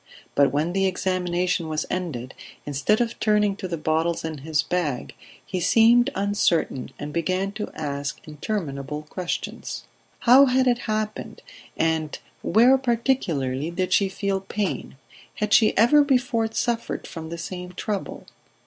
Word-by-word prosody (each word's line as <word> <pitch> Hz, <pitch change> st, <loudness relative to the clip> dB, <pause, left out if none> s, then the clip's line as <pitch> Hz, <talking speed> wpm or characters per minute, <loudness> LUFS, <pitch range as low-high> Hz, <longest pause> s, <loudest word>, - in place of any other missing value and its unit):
But 140 Hz, -2 st, +4 dB
when 155 Hz, +5 st, 0 dB
the 195 Hz, 0 st, +2 dB
examination 180 Hz, -2 st, 0 dB
was 155 Hz, -1 st, -2 dB
ended, 145 Hz, -9 st, -3 dB, 0.3 s
instead 145 Hz, -, +1 dB
of 230 Hz, -1 st, -2 dB
turning 210 Hz, -2 st, +2 dB
to 195 Hz, -, -4 dB
the 170 Hz, -2 st, -3 dB
bottles 160 Hz, +2 st, 0 dB
in 160 Hz, -2 st, -4 dB
his 150 Hz, +1 st, 0 dB
bag, 155 Hz, -8 st, -2 dB, 0.3 s
he 185 Hz, -, -3 dB
seemed 230 Hz, +6 st, +5 dB
uncertain 195 Hz, -9 st, 0 dB
and 145 Hz, 0 st, -6 dB
began 185 Hz, +4 st, 0 dB
to 210 Hz, 0 st, -5 dB
ask 140 Hz, -2 st, -4 dB
interminable 150 Hz, -4 st, -4 dB
questions. 175 Hz, +3 st, -5 dB, 0.4 s
How 260 Hz, +3 st, +8 dB
had 260 Hz, +1 st, +3 dB
it 245 Hz, -1 st, +2 dB
happened, 215 Hz, 0 st, -3 dB, 0.3 s
and 160 Hz, -2 st, 0 dB, 0.2 s
where, 250 Hz, +5 st, +5 dB
particularly, 175 Hz, -, 0 dB
did 185 Hz, +2 st, -1 dB
she 200 Hz, -1 st, +3 dB
feel 195 Hz, 0 st, -1 dB
pain... 195 Hz, -7 st, -3 dB, 0.4 s
Had 210 Hz, 0 st, -1 dB
she 220 Hz, -, +5 dB
ever 245 Hz, +8 st, +6 dB
before 250 Hz, -5 st, +1 dB
suffered 235 Hz, +1 st, -2 dB
from 160 Hz, -1 st, -7 dB
the 170 Hz, -, -5 dB
same 180 Hz, +1 st, -6 dB
trouble 200 Hz, +2 st, -4 dB
185 Hz, 140 wpm, -24 LUFS, 155-215 Hz, 0.4 s, How